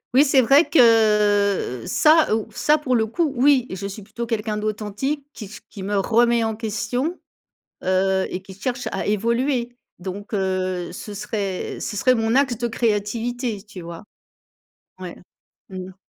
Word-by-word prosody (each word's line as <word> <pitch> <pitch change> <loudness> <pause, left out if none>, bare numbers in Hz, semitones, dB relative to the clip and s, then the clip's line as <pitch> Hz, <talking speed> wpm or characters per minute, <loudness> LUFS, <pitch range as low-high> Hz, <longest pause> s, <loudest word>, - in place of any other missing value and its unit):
Oui, 280 - +7
c'est 265 -1 +4
vrai 275 +7 +5
que, 210 - +3
heu, - - -8
ça, 310 -7 +4
ou 225 - -3
ça, 300 +8 +2
pour 255 -4 0
le 220 -1 +2
coup, 305 +5 0
oui 260 0 +4
et 185 - -5
je 195 +2 -5
suis 200 +1 -8
plutôt 230 +3 -6
quelqu'un 215 -1 -2
d'authentique 215 +7 -3
qui 215 - -8
s 210 +2 -11
qui 195 - -9
me 200 +1 -1
remet 235 +3 +3
en 220 -1 -1
question, 235 - -2 0.7
heu 190 +1 +1
et 185 - -5
qui 190 - -12
cherche 245 +5 -4
à - - -3
évoluer. 235 +4 0 0.2
Donc 200 +4 -7
heu, 185 -2 -1
ce 205 +3 -8
serait 200 -2 -4
ce 210 - -4
serait 255 +5 +3
mon 225 0 0
axe 265 -4 +2
de 240 - -1
créativité, 225 0 -2
tu 205 -4 -11
vois? 170 +3 -9 0.9
Ouais. 180 -2 -7 0.5
Mmh 185 -1 -7
mh. - - -17
220 Hz, 170 wpm, -22 LUFS, 195-245 Hz, 0.9 s, Oui